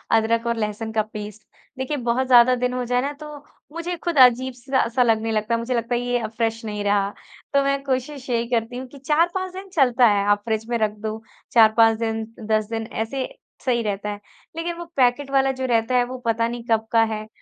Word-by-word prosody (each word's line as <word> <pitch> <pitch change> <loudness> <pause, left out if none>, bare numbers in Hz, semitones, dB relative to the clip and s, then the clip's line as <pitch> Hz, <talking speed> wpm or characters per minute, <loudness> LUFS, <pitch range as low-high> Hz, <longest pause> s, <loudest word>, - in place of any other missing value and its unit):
अदरक 225 +1 +1
और 235 0 0
लहसुन 215 +1 -3
का 220 - +2
पेस्ट। 210 0 -7 0.4
देखिए 265 +3 -2
बहुत 245 +1 0
ज़्यादा 250 0 +6
दिन 250 0 -1
हो 250 0 -2
जाए 245 +1 +1
ना 280 +2 -2
तो 300 - -7 0.5
मुझे 340 +1 -3
खुद 335 -2 -3
अजीब-सा 255 +1 0
स - - 0
लगने 225 -1 +1
लगता 220 +2 0
मुझे 230 +2 -3
लगता 235 +1 -1
है 240 - 0
ये 245 0 0
अब 215 - -4
फ्रेश 225 -1 -1
नहीं 210 -1 -4
रहा। 200 -1 +2 0.4
तो 280 - +4
मैं 275 0 0
कोशिश 265 0 -3
यही 235 -1 +1
करती 235 0 -1
हूँ 260 +1 -6
कि 280 - -14
4-5 340 +7 0
दिन 385 +1 -8
चलता 255 -6 +4
है 205 -2 +2
आप 205 0 +2
फ्रिज 220 -1 -1
में 240 - +1
रख 215 -1 +1 0.2
दो 215 +1 -5 0.3
4-5 225 0 +6
दिन 225 -1 -1 0.3
10 215 -1 +2
दिन 225 -1 -3
ऐसे 255 +4 -3 0.4
सही 240 -3 +2
रहता 205 -1 -3
है। 205 0 -5 0.4
लेकिन 335 +1 -3
वो 345 - -6
पैकेट 260 +2 +2
वाला 270 0 +3
जो - - 0
रहता 230 +2 +1
है 245 - +4
वो 255 +1 -7
पता 230 0 +1
नहीं 240 0 -6
कब 220 0 +2
का 225 -1 +5
है? 215 -1 -3
235 Hz, 220 wpm, -23 LUFS, 220-260 Hz, 0.5 s, ज़्यादा